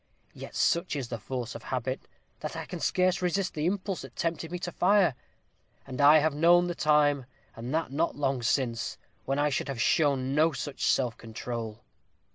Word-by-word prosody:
Yet - - -10
such 170 -1 +1
is 130 -5 -4
the 115 - -4
force 125 +2 -4
of - - -8
habit, 130 0 -3 0.3
that - - -5
I - - -5
can - - -7
scarce 185 0 +1
resist 180 +1 0
the 155 +1 -1
impulse 195 0 -2
that - - -11
tempted 165 -1 -2
me 180 - -2
to 175 0 -5
fire; 190 -4 +3 0.7
and 130 +1 -4
I 145 +2 +8
have 155 0 +2
known 170 +4 +5
the 175 - -2
time, 145 -4 +2 0.3
and 115 +3 -6
that 160 -4 -1
not 160 +5 0
long 135 -3 0
since, 120 -1 -1 0.3
when 135 +1 -1
I 145 +1 +2
should - - -1
have 135 -4 -4
shown 145 -6 +2
no 155 +2 +3
such 135 +1 -3
self 125 -3 +1
control." 115 0 -6
145 Hz, 190 wpm, -28 LUFS, 130-170 Hz, 0.7 s, I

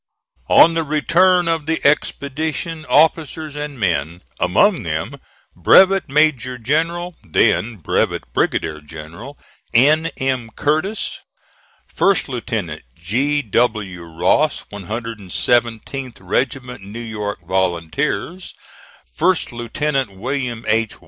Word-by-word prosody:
On 165 - +7
the 165 - +1
return 175 +4 +3
of 165 -3 -1
the 160 0 0
expedition 155 +2 -1
officers 155 0 +2
and 145 -3 -6
men 85 -3 -1 0.2
among 170 - +3
them 80 -2 -4 0.4
Brevet 195 -2 +5
Major 135 -4 +2
General 165 +8 -1
(then 110 +7 +2
Brevet 90 - -1
Brigadier 80 -1 -1
General) 80 - -10 0.4
N. 155 +7 +5
M. 130 -4 -1
Curtis, 155 +9 -1 0.7
First 195 0 +1
Lieutenant 110 - -4
G. 135 - 0
W. 105 -5 0
Ross, 85 0 +1
117th 115 +4 -2
Regiment 125 +6 -2
New 100 +4 -8
York 105 -3 -5
Volunteers, 95 - -2 0.6
First 185 - +1
Lieutenant 125 0 -2
William 125 0 -3
H. 110 0 +1
125 Hz, 100 wpm, -19 LUFS, 105-155 Hz, 0.7 s, On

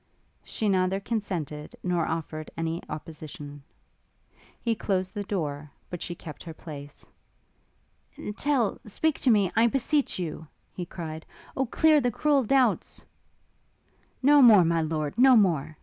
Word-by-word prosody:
She 220 - -3
neither 190 0 +2
consented 180 - -4
nor 175 -2 0
offered 155 -1 -4
any 165 +1 -2
opposition. 150 -2 -8 1.0
He 235 - 0
closed 190 -4 -2
the 205 - -3
door, 150 -7 -3 0.2
but 175 - -5
she 175 - -4
kept 155 -2 -10
her 165 -2 -9
place. 145 -3 -10 1.3
'Tell 270 -6 +1
speak 310 +8 0
to 260 - +2
me, 200 -5 +4
I 225 +2 +5
beseech 275 +4 0
you!' 165 -3 -5 0.3
he 175 -2 -5
cried, 160 -3 -6 0.3
'Oh 265 -1 0
clear 310 +4 +4
the 245 - +1
cruel 280 +3 +2
doubts 260 +2 +1 0.5
' - - -40
'No 290 +1 +7
more, 215 -8 +8
my 165 0 +2
lord, 155 +2 -2
no 260 0 +7
more!' 155 -8 +2
185 Hz, 140 wpm, -27 LUFS, 155-235 Hz, 1.3 s, more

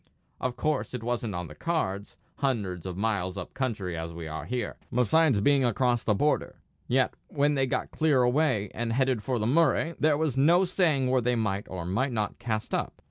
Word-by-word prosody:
Of 125 -1 -2
course 150 -4 -1
it 120 - -5
wasn't 120 -4 -2
on 90 0 -3
the 75 - -10
cards, 100 - -2 0.2
hundreds 100 - -2
of 90 -1 -5
miles 100 -3 -1
up 90 - -7
country 105 -10 -2
as 80 0 -5
we 85 -1 -6
are 80 0 -5
here, 125 -3 -3
besides 125 0 +3
being 140 +3 +4
across 120 0 +1
the 105 - +2
border; 150 +8 0 0.3
yet 130 +1 +2
when 145 0 +1
they 135 -2 +1
got 125 0 -2
clear 150 -5 +3
away, 125 -5 +1
and 115 0 -2
headed 130 -2 +1
for 125 +3 -1
the 110 - -1
Murray, 160 +4 +2
there 150 -1 +3
was 155 -4 0
no 170 +7 +5
saying 155 -8 +1
where 130 -1 +3
they 125 +1 +1
might 105 -3 -1
or 90 -2 -5
might 110 +10 0
not 105 -2 -2
cast 110 -2 -3
up. - - -1
125 Hz, 200 wpm, -28 LUFS, 100-140 Hz, 0.3 s, no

